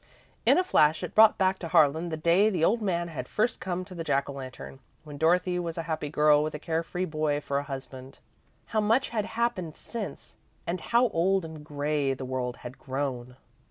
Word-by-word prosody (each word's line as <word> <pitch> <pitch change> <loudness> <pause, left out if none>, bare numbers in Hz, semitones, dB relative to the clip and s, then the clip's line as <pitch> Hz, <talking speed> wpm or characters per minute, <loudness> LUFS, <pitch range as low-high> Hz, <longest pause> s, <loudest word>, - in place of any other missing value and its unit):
In - - +6
a 365 - +3
flash 155 - +3
it - - -5
brought 220 0 +7
back 190 -1 +1
to 170 - -5
Harlan 160 +1 +3
the 160 - -3
day 170 +7 +4
the 180 -6 +1
old 230 +5 +2
man 175 -4 -1
had 130 -6 -6
first 220 +3 0
come 185 -1 -3
to 185 - -11
the 170 -2 -5
Jack 140 -3 0
o' 140 - -6
Lantern, 130 - -9 0.2
when 145 -2 -10
Dorothy 180 +2 +2
was 170 -1 -4
a 165 - -2
happy 155 -2 -3
girl 150 0 +4
with 155 0 -3
a - - -2
care 160 +1 -1
free 180 +2 -3
boy 155 -3 -1
for 140 -1 -2
a - - -4
husband. 130 -1 -8 0.5
How 220 - 0
much 225 +6 +2
had 215 -3 -1
happened 220 -8 -2
since, 225 -4 -7 0.3
and 175 +2 -3
how 235 +1 +2
old 190 0 +1
and 160 -2 -9
grey 145 -2 -1
the 130 - -6
world 125 -1 -3
had 120 +2 -8
grown! 130 -2 -4
160 Hz, 215 wpm, -28 LUFS, 145-185 Hz, 0.5 s, brought